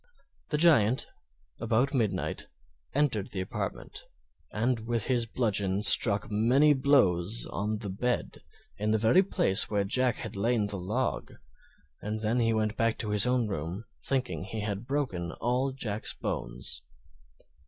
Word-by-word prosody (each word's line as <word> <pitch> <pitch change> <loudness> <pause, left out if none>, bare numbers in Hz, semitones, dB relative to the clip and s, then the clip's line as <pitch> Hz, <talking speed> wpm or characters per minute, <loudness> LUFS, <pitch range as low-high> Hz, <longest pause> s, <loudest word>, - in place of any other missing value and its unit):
The 150 - 0
Giant, 135 -8 +4 0.5
about 120 +4 +1
midnight, 105 -8 -1 0.5
entered 125 -9 +1
the 95 - -5
apartment, 95 - -6 0.5
and 120 +3 0
with 120 -3 0
his 120 -3 +1
bludgeon 105 -4 -1
struck 105 -1 +5
many 125 +8 +4
blows 120 -8 +2
on 105 +2 -3
the 105 -2 -6
bed, 120 +5 -2 0.4
in 105 +1 -1
the 110 - +3
very 115 - +4
place 110 - +2
where 105 -2 +1
Jack 125 +5 +1
had 110 -3 -7
laid 105 0 0
the 100 -2 -3
log; 110 +8 -2 0.7
and 105 +1 -4
then 110 +3 0
he 115 -1 +2
went 110 -1 0
back 115 -1 0
to 105 - -3
his 105 +2 +4
own 125 -2 +1
room, 95 +3 -5 0.2
thinking 130 -7 -2
he 110 +1 -5
had 105 +2 -4
broken 100 - -2
all 125 +3 -1
Jack's 110 -5 -4
bones. - - -4
110 Hz, 145 wpm, -29 LUFS, 100-125 Hz, 0.7 s, struck